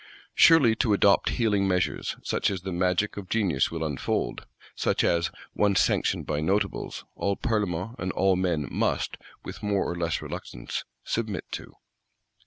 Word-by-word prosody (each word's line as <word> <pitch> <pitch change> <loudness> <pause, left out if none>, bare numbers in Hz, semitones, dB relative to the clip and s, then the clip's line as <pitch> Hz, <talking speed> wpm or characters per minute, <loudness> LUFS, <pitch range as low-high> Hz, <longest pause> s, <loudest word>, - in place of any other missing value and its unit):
Surely 150 -10 +6
to 110 -2 +2
adopt 100 0 +4
healing 105 -4 +2
measures; 90 -1 0
such - - 0
as 95 -3 -4
the 95 - -4
magic 90 +4 0
of 100 -3 -7
genius 95 -12 +1
will 80 -1 -4
unfold; 75 -3 -2 0.3
such - - +1
as, 85 0 +2 0.2
once 100 -2 +3
sanctioned - - +1
by 75 -1 -1
Notables, 95 +6 -1
all 100 0 -1
Parlements 105 -3 -1
and 95 +1 -2
all 95 -1 +3
men 90 -5 0
must, - - 0 0.3
with - - -8
more 100 -2 0
or 85 - -3
less 85 -1 -1
reluctance, - - -6 0.2
submit 110 -5 -2
to. - - -7
95 Hz, 155 wpm, -27 LUFS, 85-105 Hz, 0.3 s, Surely